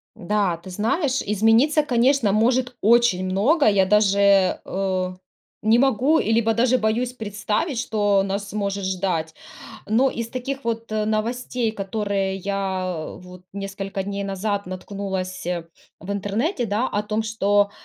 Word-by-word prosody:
Да, 195 -2 0
ты 185 +3 -12
знаешь, 250 - 0
измениться, 225 +9 +3
конечно, 250 -3 +2
может 245 +4 +1
очень 225 -4 +4
много, 220 - +2
я 200 -3 +4
даже, 200 -2 +4
э, 185 -1 -2 0.5
не 220 +2 +4
могу, 270 +4 +3
и, 225 - 0
либо, 225 0 +3
даже 245 +3 +3
боюсь 240 +2 0
представить, 215 - -2
что 205 -5 +1
нас 200 +1 -3
может 200 -1 -2
ждать. 180 -4 -1 0.5
Но, 250 +5 +3
из 230 -1 -4
таких 270 +2 -5
вот, 230 -1 -3
э, 215 0 0
новостей, 230 +2 -1
которые 195 -1 -2
я, 190 -4 -3
вот, 180 0 -13
несколько 195 0 -4
дней 200 0 -4
назад 200 +1 -2
наткнулась 185 -1 -5 0.5
в 190 +4 -6
интернете, 225 - -1
да, 215 +5 0
о 205 - -1
том, 215 +1 -2
что, 205 -2 +1
210 Hz, 140 wpm, -23 LUFS, 195-235 Hz, 0.5 s, очень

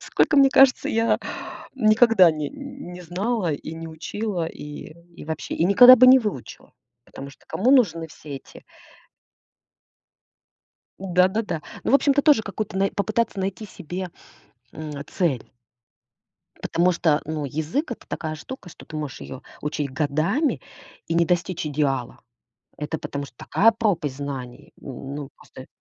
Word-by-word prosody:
Сколько, 300 - +1
мне 275 -1 +7
кажется, 270 -1 +5
я 225 +1 +2 0.6
никогда 215 -6 +5
не 155 -1 -4
м, 275 -8 -9
не 180 - -9
знала, 180 +2 -2
и 155 +2 -6
не 165 0 -7
учила, 175 +2 -4
и 150 -2 -9 0.4
и - - -10
вообще, 160 0 -5
и - - +1
никогда 245 +7 +9
бы 255 +2 +7
не 260 +1 +9
выучила. 205 - -6 0.3
Потому 135 - -10
что - - -20
кому 240 +7 +1
нужны 165 - +3
все 150 -2 -9
эти - - -14 2.4
Да-да-да. 185 -2 +1 0.2
Ну, - - 0
в - - +6
общем-то, 285 0 +4
тоже 285 -8 +5
какое-то 205 -1 -5
най 195 +1 +1
попытаться 215 +1 -1
найти 195 +3 -3
себе, 185 0 -6 0.6
м, 150 -2 -7
цель. 155 - -2 1.1
Потому 180 +2 +2
что, 160 -3 +2
ну, 155 -1 -4
язык- 160 - -2
это - - -11
такая 155 -1 -4
штука, 205 - -9
что - - -13
ты 155 - -8
можешь 150 - -5
её 70 -1 -9 0.2
учить 150 -1 -3
годами 155 - 0 0.5
и 165 - -2
не 170 0 +4
достичь 175 -1 -1
идеала. 135 -4 -2 0.6
Это 150 +1 -3
потому 140 0 -5
что 130 - -19
такая 225 +3 +3
пропасть 170 - -1
знаний! 135 -4 -7
М, 135 +1 -7
ну 145 -1 -6
просто. 130 - -13
175 Hz, 150 wpm, -23 LUFS, 150-215 Hz, 2.4 s, никогда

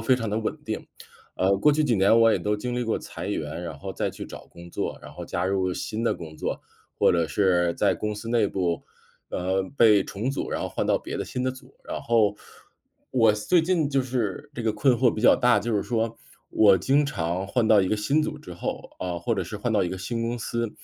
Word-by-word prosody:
非 125 +3 +3
常 115 -3 -3
地 105 - -1
稳 110 - -2
定。 - - -4 0.5
呃， 95 +1 +3
过 150 - +5
去 155 +1 +2
几 120 -5 +2
年 100 +4 +5
我 115 -1 +6
也 - - +2
都 105 0 -1
经 125 +3 -4
历 125 - 0
过 115 - 0
裁 - - -7
员， 85 - -3
然 80 -4 -6
后 - - -6
再 - - -2
去 - - -8
找 - - -10
工 85 0 -13
作， - - -3
然 - - -11
后 - - -7
加 90 - -2
入 95 -1 +1
了 90 - -2
新 110 +1 -4
的 - - +2
工 80 -2 -9
作， - - -3 0.4
或 - - +5
者 85 -2 +2
是 85 -1 +2
在 - - +2
公 105 0 -3
司 105 +2 -7
内 115 -3 +3
部， 90 -4 -1 0.5
呃， 95 +1 0
被 105 -4 +6
重 110 +6 -4
组， 140 - -3
然 - - -2
后 - - -2
换 - - -2
到 - - +3
别 - - -6
的 - - -3
新 125 - -4
的 130 - +1
组。 130 0 -15
然 - - -5
后， 110 -3 +2 0.7
我 115 -4 +4
最 135 +12 +2
近 165 -4 +1
就 135 - +2
是 125 +1 -3
这 120 - -5
个 110 -1 +1
困 125 +4 +3
惑 120 0 +3
比 110 - -4
较 - - +7
大， 125 -4 +4
就 115 +1 -2
是 100 - +1
说 115 -1 -1 0.3
我 100 -4 +5
经 140 - +3
常 90 -7 -2
换 120 -1 +1
到 105 -2 +6
一 95 - 0
个 110 - +1
新 140 +9 +1
组 150 -1 -4
之 90 -12 -10
后， 85 - -5
嗯， 90 -1 -2
或 85 +7 -1
者 100 - -1
是 105 - -6
换 110 +2 -2
到 105 - +3
一 90 - -1
个 95 - -5
新 115 +5 -3
公 120 +1 -2
司， 115 0 -2
110 Hz, 270 characters per minute, -25 LUFS, 95-120 Hz, 0.7 s, 较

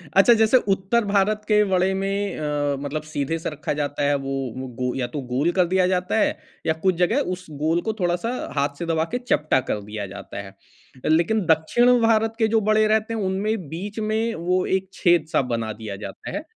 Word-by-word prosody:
अच्छा, 195 +5 +7
जैसे 225 +3 +5 0.2
उत्तर 205 +4 0
भारत 205 +1 +1
के 210 -1 +4
वड़े 185 +1 +2
में 195 +1 -2
अ, 145 -2 -1
मतलब 145 +2 -3
सीधे 155 +1 -2
से - - -3
रखा 150 -1 -3
जाता 145 0 -2
है 145 0 +3
वो 130 -2 -4
गो 125 0 0
या 125 -2 -1
तो 140 +3 -5
गोल 145 +7 +2
कर 180 0 +3
दिया 185 0 +2
जाता 180 +2 0
है, - - +1 0.3
या 160 - +2
कुछ 180 +3 0
जगह 180 +10 +2 0.2
उस 180 0 -15
गोल 165 +3 +1
को 220 - -2
थोड़ा-सा 175 +5 0 0.3
हाथ 140 0 0
से 170 - -3
दबा 160 -1 +1
के 245 - 0
चपटा 155 - +1
कर 105 - -1
दिया 105 0 -5
जाता 100 0 -7
है। 95 0 -13 0.5
लेकिन 170 +6 +2
दक्षिण 240 +10 +4
भारत 225 0 +3
के 220 - +4
जो 220 - +4
वड़े 215 0 +4
रहते 220 +1 +1
हैं, 220 - -2
उनमें 190 -1 -1
बीच 200 +6 -5
में 220 +2 0
वो 180 +2 0
एक 190 - -20
छेद-सा 170 -5 +2
बना 115 -1 -2
दिया 105 -3 -5
जाता 95 - -8
है। - - -4
180 Hz, 205 wpm, -23 LUFS, 145-210 Hz, 0.5 s, अच्छा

